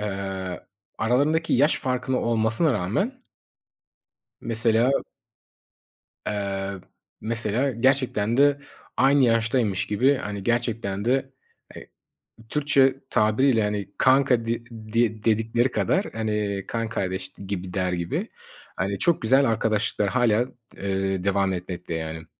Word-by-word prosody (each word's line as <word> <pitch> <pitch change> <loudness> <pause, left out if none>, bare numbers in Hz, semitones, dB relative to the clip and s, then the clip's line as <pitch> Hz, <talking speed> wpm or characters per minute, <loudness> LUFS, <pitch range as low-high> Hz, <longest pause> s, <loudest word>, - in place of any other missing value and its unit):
eee, 95 -3 -4 0.3
aralarındaki 145 +8 +1
yaş 145 +5 +3
farkılı 130 0 -1
olmasına 115 +6 +1
rağmen 195 - -2 1.2
mesela. 115 +2 +2 1.3
Eee, 100 -1 -3 0.4
mesela, 115 +4 -1
gerçekten 120 -3 +1
de 145 +1 +4 0.4
aynı 135 +1 +4
yaştaymış 115 -4 +1
gibi, 125 +7 +3
hani, 105 -7 -5
gerçekten 115 -3 -1
de, 135 +2 0 0.4
eee, - - -11 0.6
Türkçe 140 -1 +3 0.2
tabiriyle, 110 +3 +3
hani, 105 -1 -2
kanka 130 -3 +3
de 115 +1 -1
de 110 -1 -1
dedikleri 115 +3 +2
kadar, 190 +9 +1
hani, 105 -3 -2
kan 115 -1 -2
kardeş 95 -3 -3 0.2
gibi, 95 -2 -5
der 90 -2 0
gibi, 85 -1 -2 0.5
hani, 100 +1 -2
çok 170 - +2
güzel 130 +5 +4
arkadaşlıklar 110 -2 0
hâlâ, 120 0 +2 0.3
eee, 95 -1 -2
devam 100 -1 +1
etmekte, 90 -1 -5
yani. 80 0 -5
110 Hz, 110 wpm, -24 LUFS, 100-130 Hz, 1.3 s, de